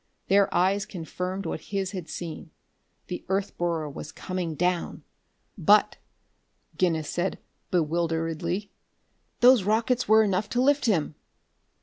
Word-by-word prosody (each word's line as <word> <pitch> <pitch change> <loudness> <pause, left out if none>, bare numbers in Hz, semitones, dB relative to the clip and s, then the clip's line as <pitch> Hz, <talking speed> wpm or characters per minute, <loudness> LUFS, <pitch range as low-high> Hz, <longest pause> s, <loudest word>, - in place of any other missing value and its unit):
Their 200 +1 +4
eyes 195 +3 +2
confirmed 180 +2 -5
what - - -3
his 195 -2 -3
had 180 -5 -6
seen. 165 -1 -6 0.6
The 180 - -6
earth 195 +1 -1
borer 170 -3 -1
was 145 - -8
coming 180 -4 -4
down! 180 +1 -1 0.6
"But," 205 +5 +4 0.8
Guinness 165 -4 +1
said 175 +4 -2 0.3
bewilderedly, 170 +2 -1 0.7
"those 250 -1 +7
rockets 225 +5 +1
were 220 +1 +6
enough 200 0 0
to 245 - -1
lift 285 -1 +3
him!" 165 -9 +1
185 Hz, 120 wpm, -26 LUFS, 170-205 Hz, 0.8 s, those